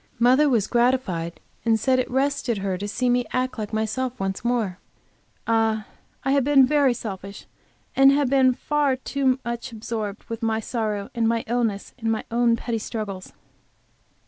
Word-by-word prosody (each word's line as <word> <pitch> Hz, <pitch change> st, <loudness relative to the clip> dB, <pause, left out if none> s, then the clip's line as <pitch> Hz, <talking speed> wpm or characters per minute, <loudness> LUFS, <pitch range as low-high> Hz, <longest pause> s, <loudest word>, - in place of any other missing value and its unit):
Mother 255 Hz, +5 st, +5 dB
was 230 Hz, -6 st, +2 dB
gratified, 235 Hz, -9 st, 0 dB, 0.2 s
and 225 Hz, -1 st, +2 dB
said 255 Hz, +3 st, +2 dB
it 255 Hz, -, -1 dB
rested 270 Hz, -3 st, 0 dB
her 195 Hz, -1 st, -2 dB
to 200 Hz, +3 st, -4 dB
see 250 Hz, +4 st, -1 dB
me 245 Hz, 0 st, +2 dB
act 255 Hz, -1 st, -1 dB
like 210 Hz, -1 st, -4 dB
myself 225 Hz, +4 st, -2 dB
once 195 Hz, +1 st, -3 dB
more. 230 Hz, -6 st, -1 dB, 0.7 s
Ah, 225 Hz, -1 st, +1 dB, 0.4 s
I 270 Hz, -, +1 dB
have 280 Hz, -1 st, +3 dB
been 275 Hz, -1 st, +6 dB
very 280 Hz, -2 st, +3 dB
selfish, 200 Hz, -3 st, -7 dB, 0.5 s
and 270 Hz, 0 st, +7 dB
have 285 Hz, 0 st, +2 dB
been 260 Hz, -1 st, +4 dB
far 290 Hz, 0 st, +1 dB
too 265 Hz, 0 st, 0 dB
much 235 Hz, 0 st, -4 dB
absorbed 215 Hz, -2 st, -5 dB
with 230 Hz, +1 st, -6 dB
my 225 Hz, -1 st, 0 dB
sorrow 215 Hz, -3 st, -3 dB
and 230 Hz, -2 st, +1 dB
my 230 Hz, 0 st, +1 dB
illness 225 Hz, -4 st, -1 dB
and 225 Hz, -1 st, 0 dB
my 220 Hz, -, -1 dB
own 235 Hz, 0 st, +3 dB
petty 230 Hz, 0 st, -3 dB
struggles. 205 Hz, -4 st, -5 dB
235 Hz, 170 wpm, -24 LUFS, 215-255 Hz, 0.7 s, and